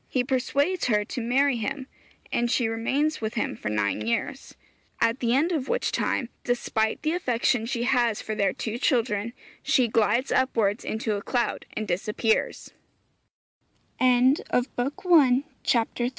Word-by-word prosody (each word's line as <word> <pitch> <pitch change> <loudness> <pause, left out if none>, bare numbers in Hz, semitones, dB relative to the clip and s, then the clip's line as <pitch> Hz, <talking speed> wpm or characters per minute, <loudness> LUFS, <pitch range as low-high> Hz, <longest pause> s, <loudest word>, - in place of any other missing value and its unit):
He 255 - 0
persuades 280 +7 0
her 210 -3 +1
to 245 - -5
marry 260 +3 +2
him, 265 +4 -4 0.5
and 240 0 0
she 240 -1 +1
remains 265 +7 -1
with 220 +1 -3
him 215 - -1
for 105 - -5
nine 105 0 -1
years, 190 - -3 0.4
at 230 +3 +1
the 235 0 +1
end 315 +6 +2
of 290 -6 -2
which - - 0
time, 240 - -1
despite 220 -1 -1
the 310 - +1
affection 245 -7 0
she 235 -1 -2
has 240 -4 +2
for 220 - -4
their 200 -3 +1
two 225 +4 -5
children, 235 -5 0 0.3
she 255 -3 +2
'glides 225 +3 +1
upwards 225 -5 +1
into 220 -1 -2
a - - -5
cloud' 240 +3 -2
and 215 0 -4
disap 190 +4 -3
235 Hz, 135 wpm, -26 LUFS, 215-265 Hz, 0.5 s, marry